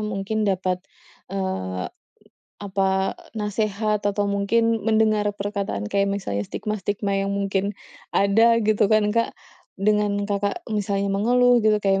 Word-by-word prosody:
mungkin 210 0 -2
dapat, 185 -1 0 0.5
eee, 95 - -3 0.7
apa 195 -1 0 0.5
nasehat 210 0 -1
atau 205 0 0
mungkin 200 +3 +1 0.2
mendengar 215 -1 +3
perkataan 200 - -3
kayak 200 0 +2
misalnya 195 - -2
stigma-stigma 205 -1 -2
yang 195 - -1
mungkin 200 0 -1 0.4
ada 225 +4 +5
gitu 210 -1 +3
kan 215 0 +4
Kak, 230 0 0 0.4
dengan 205 0 +1
Kakak 200 0 -2
misalnya 200 -1 0
mengeluh 245 +4 +4
gitu 215 -1 +4
kayak 195 0 +3
200 Hz, 120 wpm, -23 LUFS, 195-215 Hz, 0.7 s, ada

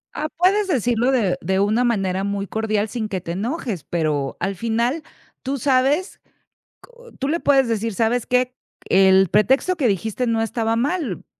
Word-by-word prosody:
Ah, 305 - -2
puedes 390 +3 +3
decirlo 245 - +1
de 215 -8 +1
de 190 +3 0
una 215 +5 +2
manera 195 -5 0
muy 200 0 -2
cordial, 215 0 -1
sin 220 -1 -4
que 190 - -2
te 170 -1 -7
enojes. 215 - -3
Pero 150 -5 -2
al 195 +2 -2
final, 235 - -1 0.4
tú 275 +1 -3
sabes, 275 - +1 0.7
co 485 -1 -17
Tú 270 - -2
le 335 +3 0
puedes 270 -3 +3
decir: 225 -1 -2
"¿Sabes 230 +3 0
qué?". 250 0 +1 0.3
El 190 0 +5
pretexto 265 - +2
que 275 -7 +1
dijiste 220 +5 -1
no 225 -1 +1
estaba 225 0 -1
mal, 270 - -2
230 Hz, 170 wpm, -21 LUFS, 200-265 Hz, 0.7 s, El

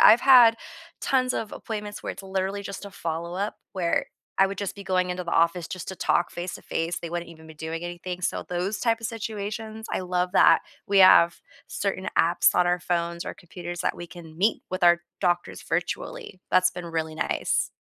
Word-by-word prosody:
I've 225 +3 +8
had 245 -4 +8 0.4
tons 255 -2 +1
of 215 - -3
appointments 210 -2 -6
where - - -3
it's - - -10
literally 195 +1 -2
just 200 0 -7
a 200 - -8
follow-up 170 +5 -3 0.2
where 175 -3 0 0.3
I 195 - +7
would 195 0 -6
just 200 0 -3
be 200 - -9
going 185 -1 +1
into 180 0 -3
the 170 - -4
office 170 +1 +2
just 185 - -6
to 190 - -5
talk 175 - +1
face 175 +1 -5
to - - -10
face, 165 +1 -2
they 170 - -6
wouldn't 175 0 -4
even 160 -1 -14
be 160 - -11
doing 160 +2 -5
anything, 175 +1 -5
so - - -1
those 180 +4 -2
type 230 -1 +1
of 230 - -2
situations, 220 0 -5
I - - 0
love 180 0 -1
that - - +6 0.3
we 200 0 +3
have 180 -2 +7 0.3
certain 190 -1 -2
apps 170 +1 +4
on 180 - +4
our 175 0 +2
phones 170 -1 -2
or - - -5
computers 175 -2 -8
that - - -1
we 175 - -7
can 165 -2 -12
meet 210 +4 +2
with 185 -1 0
our 175 0 +6 0.2
doctors 175 -2 0
virtually. - - -3
That's 185 0 +5
been 180 -1 -7
really 160 -1 -3
nice. - - 0
180 Hz, 205 wpm, -26 LUFS, 175-200 Hz, 0.4 s, I've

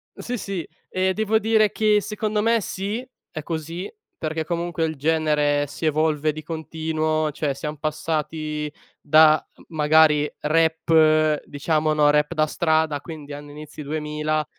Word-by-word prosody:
sì, 245 0 -4
sì, 195 -6 -5 0.2
e 185 0 0
devo 220 +2 +1
dire 220 -1 +3
che 215 -1 +2
secondo 210 0 -2
me 230 0 +2
sì, 200 +6 -4 0.3
è 155 - -5
così, 165 +3 -5 0.3
perché 160 0 -3
comunque 170 -1 -2
il 160 -1 -3
genere 150 -1 +1
si 145 +3 -6
evolve 155 0 +1
di 155 - -8
continuo, 155 -1 -2
cioè 145 -1 -2
siam 150 +2 -5
passati 155 0 -3 0.3
da, 155 +1 +5 0.3
magari, 150 -1 +4
rap, 155 -1 +3
diciamo, 155 +1 0
no, 150 -1 +4
rap 150 +2 +1
da 155 -1 +2
strada, 155 -2 +1
quindi 150 -2 -9
anno 145 0 -9
inizi 150 +1 -10
2000, 150 +1 -2
155 Hz, 140 wpm, -23 LUFS, 150-165 Hz, 0.3 s, da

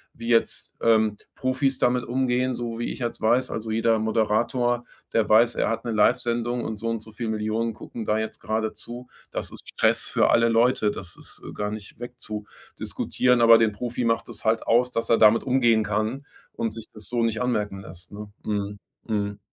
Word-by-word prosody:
wie 115 - -8
jetzt, 115 -1 +1
ähm, 110 -2 +3 0.2
Profis 130 +1 0
damit 125 0 +2
umgehen, 125 0 0
so 115 -1 -4
wie 120 - -2
ich - - -6
jetzt 120 -1 -3
weiß. 120 +4 +2
Also, 110 0 -4
jeder 115 0 +2
Moderator, 115 +3 +1 0.3
der 110 -2 +2
weiß, 115 +2 +5
er - - +1
hat 115 +2 -3
'ne 115 - -1
Livesendung 120 +2 +1
und 110 - -4
so 115 +2 -3
und 115 -1 -2
so 110 - -13
viel 115 +2 -5
Millionen 110 +1 -1
gucken 110 +1 -7
da 105 - +1
jetzt 110 0 -4
grade 110 0 -2
zu. 120 +1 -9 0.2
Das - - -4
ist - - -7
Stress - - +2
für - - +3
alle 115 0 +4
Leute, 115 -1 +3
das 90 -3 -5
ist - - -8
gar 105 0 -2
nicht 110 +1 -8
wegzudiskutieren, 120 +1 -2
aber 115 -1 +8
den 110 -2 +3
Profi 120 +4 -3
macht 115 -1 +1
es - - -7
halt 110 0 +1
aus, 125 +2 +3
dass 115 -1 -2
er 115 - +6
damit 110 +1 +6
umgehen 120 -4 +3
kann 110 +7 -2 0.3
und 115 -2 -2
sich 115 -1 -9
das 110 -1 -9
so 120 -1 0
nicht 115 -1 0
anmerken 105 -6 -1
lässt, 90 -1 -10
ne? 105 0 -9
Mhm. 100 -1 -3 0.3
Mhm. 100 -2 -2
115 Hz, 195 wpm, -25 LUFS, 110-120 Hz, 0.3 s, aber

